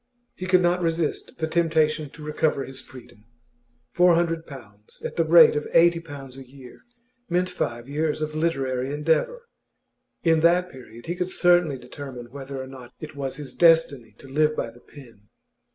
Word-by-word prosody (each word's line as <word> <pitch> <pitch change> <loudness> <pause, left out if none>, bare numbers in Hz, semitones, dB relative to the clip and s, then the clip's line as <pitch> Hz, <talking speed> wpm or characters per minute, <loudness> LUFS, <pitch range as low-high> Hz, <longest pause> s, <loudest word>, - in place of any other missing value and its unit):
He 185 - -7
could 185 0 +4
not 175 +1 +2
resist 165 -2 -2
the 160 - -1
temptation 160 -2 +1
to 150 - -13
recover 150 -2 0
his 130 0 -7
freedom. 120 -5 -15 0.7
Four 175 +2 +4
hundred 165 -1 -1
pounds, 105 -6 -14
at - - -5
the 165 - +2
rate 165 0 +7
of 150 - -2
eighty 170 0 +5
pounds 140 -5 -10
a - - -9
year, 130 -1 -14 0.5
meant 180 +1 0
five 120 -7 -4
years 150 +2 -1
of 155 0 -3
literary 135 -5 -1
endeavour. 160 - 0 0.8
In 165 -1 +4
that 175 +2 +3
period 120 -3 -13
he 170 - -2
could 180 0 -3
certainly 175 -6 +3
determine 125 -1 -9
whether 135 0 -7
or 130 - -5
not 130 -2 -12
it 155 -1 -9
was 135 -2 -4
his 145 -1 -8
destiny 150 -10 +3
to - - -14
live 155 +3 +1
by 115 - -3
the 120 +1 -19
pen. 115 -8 -16
150 Hz, 175 wpm, -24 LUFS, 130-165 Hz, 0.8 s, rate